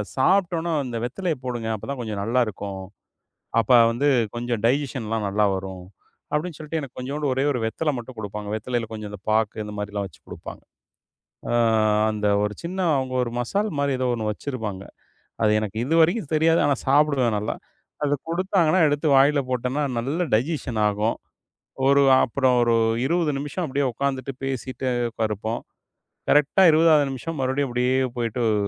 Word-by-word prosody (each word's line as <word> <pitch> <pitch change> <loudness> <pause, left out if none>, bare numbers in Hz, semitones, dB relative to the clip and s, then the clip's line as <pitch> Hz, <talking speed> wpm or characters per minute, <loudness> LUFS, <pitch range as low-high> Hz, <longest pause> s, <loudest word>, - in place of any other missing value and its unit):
"சாப்ட்டோன்ன 175 +2 +2
அந்த 120 -2 -4
வெத்தலைய 165 +6 -2
போடுங்க. 120 -3 -3
அப்பதான் 135 +6 -6
கொஞ்சம் 105 -3 -4
நல்லா 120 +4 +1
இருக்கும். 100 -2 -6 0.8
அப்ப 110 - -4 0.2
வந்து 140 +5 +1 0.3
கொஞ்சம் 120 -2 -2
டைஜெஸ்ஸன்லாம் 120 -5 -1
நல்லா 105 +2 +1
வரும்" 95 -1 -7 0.5
அப்டின்னு 160 +2 -2
சொல்ட்டு 155 +1 -4
எனக்குக் 140 -2 -9
கொஞ்சூண்டு 140 +2 -2
ஒரே 135 +2 0
1 125 - -2
வெத்தல 150 +7 -1
மட்டும் 120 +1 -9
குடுப்பாங்க. 105 0 -6
வெத்தலையில 115 +1 -2
கொஞ்சம் 105 -1 -6
அந்தப் 105 0 -11
பாக்கு 110 0 0
இந்த 105 - -7
மாரில்லாம் 105 -1 -3
வச்சு - - -21
குடுப்பாங்க. - - -9 0.9
அ - - 0 0.6
அந்த 105 -1 -1 0.2
ஒரு 105 0 -1
சின்ன, 180 +3 -4 0.2
அவுங்க 130 -1 -3
ஒரு 120 - -4
மசால் 200 - -1
மாரி 140 -1 +1
ஏதோ 130 - 0
ஒண்ணு 110 -2 -2
வச்சிருப்பாங்க. 105 -5 -5 0.6
அது 105 - +4
எனக்கு 110 0 -5
இதுவரைக்கும் 165 - +2
தெரியாது. 165 +2 +3
ஆனா 140 - +2
சாப்பிடுவேன் 135 -5 +3
நல்லா. 105 - -2 0.5
அதக் 145 -1 -1
குடுத்தாங்கன்னா, 185 -1 +2
எடுத்து 145 +2 -1
வாயில 140 +2 +5
போட்டேன்னா, 125 +3 -1 0.2
நல்ல 145 +9 -1
டைஜெஸ்ஸன் 125 -2 -1
ஆகும். 105 +2 0 0.7
ஒரு 140 +1 +5 0.2
அப்புறம் 130 0 +1
ஒரு 120 -1 +3 0.3
20 170 +1 +1
நிமிஷம் 145 +6 -4
அப்டியே 140 0 0
உக்காந்துட்டு, 135 +1 -2
பேசிட்டு 130 0 -3 0.4
இருப்போம். 110 +2 -3 0.7
கரெக்ட்டா 150 +6 +4
20வது 155 -2 +5
நிமிஷம் 145 +5 -5
மறுபடியும் 130 +2 0
இப்டியே 125 +1 +1 0.2
போயிட்டு 120 0 -2
அ - - +2
130 Hz, 155 wpm, -24 LUFS, 110-150 Hz, 0.9 s, வாயில